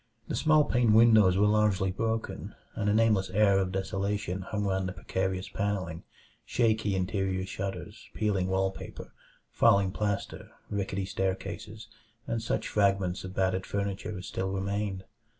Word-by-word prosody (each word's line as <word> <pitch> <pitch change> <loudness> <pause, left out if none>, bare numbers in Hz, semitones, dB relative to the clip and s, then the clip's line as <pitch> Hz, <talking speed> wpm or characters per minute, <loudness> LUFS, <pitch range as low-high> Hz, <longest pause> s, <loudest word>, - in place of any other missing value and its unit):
The - - -2
small 155 -1 +4
paned 120 -5 +3
windows 110 -5 +6
were 105 - +4
largely 105 -3 +2
broken, 115 +3 -3 0.2
and 105 -2 -1
a - - +3
nameless 110 -4 +3
air 100 0 +4
of 95 -1 -1
desolation 95 0 -2
hung 105 +2 -3
round 95 -1 0
the - - -6
precarious 95 +1 -2
panelling, 95 -5 -2 0.4
shaky 110 -4 +1
interior 95 -1 -1
shutters, 95 0 -6
peeling 100 -4 0
wall 95 0 +1
paper, - - -10 0.4
falling 100 -1 +4
plaster, 105 0 -3 0.2
rickety 100 -1 -2
staircases, 95 +3 -4 0.4
and 115 -1 -2
such 115 - -2
fragments 100 -3 +1
of 95 +1 -8
battered 95 0 0
furniture 100 0 -3
as 90 - -7
still 95 -3 -3
remained. 95 0 -2
100 Hz, 145 wpm, -29 LUFS, 95-105 Hz, 0.4 s, windows